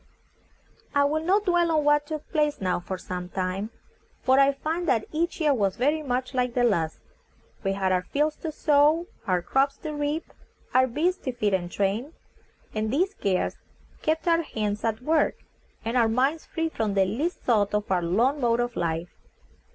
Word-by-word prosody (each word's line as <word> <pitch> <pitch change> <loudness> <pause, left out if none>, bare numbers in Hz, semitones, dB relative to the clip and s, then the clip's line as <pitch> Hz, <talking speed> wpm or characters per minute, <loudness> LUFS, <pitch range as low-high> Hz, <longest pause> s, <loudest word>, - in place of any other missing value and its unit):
I 285 - +5
will 310 +2 +1
not 400 +5 +2
dwell 350 -2 +3
on 305 -2 +2
what 295 0 +3
took 310 -1 -5
place 300 -2 +1
now 185 -2 0
for 185 +2 -5
some 180 0 -6
time, 190 +3 -2 0.5
for 260 +1 +4
I 275 0 +6
find 320 +5 -3
that 230 -6 +2
each 335 +3 -1
year 300 -3 +3
was 200 -6 +1
very 295 +6 +1
much 255 -2 -2
like 250 -2 0
the 245 - +3
last. 170 -9 +1 0.6
We 195 -1 +1
had 190 -1 0
our 185 -1 +2
fields 300 +10 0
to 320 - -4
sow, 300 +2 +3 0.2
our 180 -2 +1
crops 275 +6 +1
to 310 - -3
reap, 295 +2 -3 0.4
our 260 0 +5
beasts 330 +9 0
to 260 - 0
feed 215 -5 0
and 175 -2 -1
train; 210 +10 -1 0.6
and 215 0 -1
these 365 +9 +1
cares 195 - -1 0.4
kept 320 +2 0
our 335 0 +4
hands 210 -8 -3
at 225 +1 -1
work, 310 +2 +2 0.5
and 230 +2 -2
our 235 -3 +4
minds 270 +7 +1
free 325 -1 -2
from 215 -9 -2
the 195 -1 +4
least 280 - -2
thought 210 -4 +2
of 210 -1 -2
our 180 -2 +3
lone 235 - +1
mode 235 -1 +2
of 240 0 -1
life. 165 +1 -2
255 Hz, 190 wpm, -26 LUFS, 205-305 Hz, 0.6 s, I